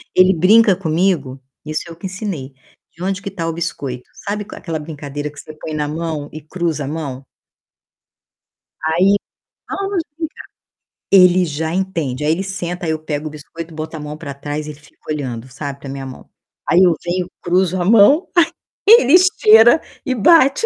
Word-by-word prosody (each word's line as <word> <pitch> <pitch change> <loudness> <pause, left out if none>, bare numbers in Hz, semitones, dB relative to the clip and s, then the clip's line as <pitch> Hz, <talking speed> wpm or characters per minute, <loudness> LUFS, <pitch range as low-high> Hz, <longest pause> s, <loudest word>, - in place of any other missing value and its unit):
Ele 185 +1 +6
brinca 200 +4 +5
comigo, 160 -6 0 0.2
isso 155 0 -3
eu 165 - -9
que 170 - -10
ensinei, 185 -8 -5 0.5
onde 190 +1 -2
que 200 - -5
está 175 -4 -4
o 165 - -1
biscoito? 140 -7 -5 0.2
Sabe 210 +1 -2
aquela 165 -3 -5
brincadeira 145 -1 -6
que 145 - -13
você 155 - -10
põe 155 +1 -7
na 150 -1 -1
mão 155 -1 -4
e 155 - -8
cruza 155 -1 -3
a - - -6
mão? 140 -3 -5 1.6
Aí, 180 +6 +3 0.5
vamos 390 -3 -2
brincar. 320 -2 -6 0.7
Ele 180 -1 +6
já 160 +1 -3
entende, 165 -8 -2
aí 150 - +2
ele 175 +4 0
senta, 180 -2 -4
aí 160 - 0
eu 155 - -2
pego 155 -1 -4
o - - -4
biscoito, 160 +2 -9
boto 155 +1 -6
a - - -7
mão 150 0 -7
para 150 -4 -7
trás 145 +2 -5
e 150 - -6
fico 150 +2 -20
olhando, 130 -5 -4
sabe, 140 +1 -7
para 140 - -9
minha 135 0 -6
mão. 130 -1 -10 0.4
Aí 175 - +5
eu 175 -3 +4
venho, 175 +1 -2
cruzo 185 +1 +1
a - - 0
mão, 230 - +5 0.6
ele 415 - +7
esteira 320 - +6 0.3
e 260 - 0
bate. 275 - +5
165 Hz, 175 wpm, -18 LUFS, 150-190 Hz, 1.6 s, ele